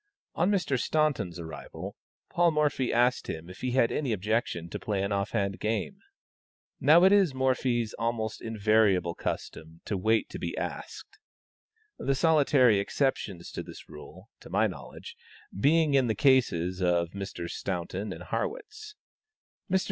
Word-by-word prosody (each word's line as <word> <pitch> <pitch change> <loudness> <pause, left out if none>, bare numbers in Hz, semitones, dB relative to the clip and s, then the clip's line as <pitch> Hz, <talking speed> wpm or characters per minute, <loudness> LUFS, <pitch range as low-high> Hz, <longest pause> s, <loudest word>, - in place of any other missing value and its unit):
On 175 +3 +1
Mr. 175 -10 +1
Staunton's 145 - 0
arrival, 80 -2 -8 0.4
Paul 175 0 +4
Morphy 150 -5 +1
asked 120 +1 +2
him 80 +3 -6
if 90 - -12
he 125 -1 -2
had 120 -3 +3
any 135 -6 -1
objection 105 -4 -1
to - - -5
play 100 -2 -2
an 100 - -2
off 100 0 0
hand 100 -3 -1
game. 110 - -2 0.8
Now 165 +4 +6
it 190 - +7
is 195 -9 +4
Morphy's 125 -3 0
almost 115 -1 -2
invariable 105 -5 +2
custom 80 0 -6
to 105 - -2
wait 110 +4 +1
to - - -6
be - - -4
asked; - - -6 0.8
the 135 - 0
solitary 140 -7 +4
exceptions 100 -6 -2
to - - -5
this - - -11
rule 75 - -13
(to - - -13
my - - +2
knowledge) - - -7 0.4
being 150 - +3
in 135 -3 +4
the 110 - 0
cases 95 -8 +2
of 85 -2 +1
Messrs. 95 -3 -5
Staunton 95 +2 -4
and - - -7
Harrwitz. 435 -3 -5 0.8
Mr. 190 - +4
115 Hz, 150 wpm, -28 LUFS, 95-145 Hz, 0.8 s, it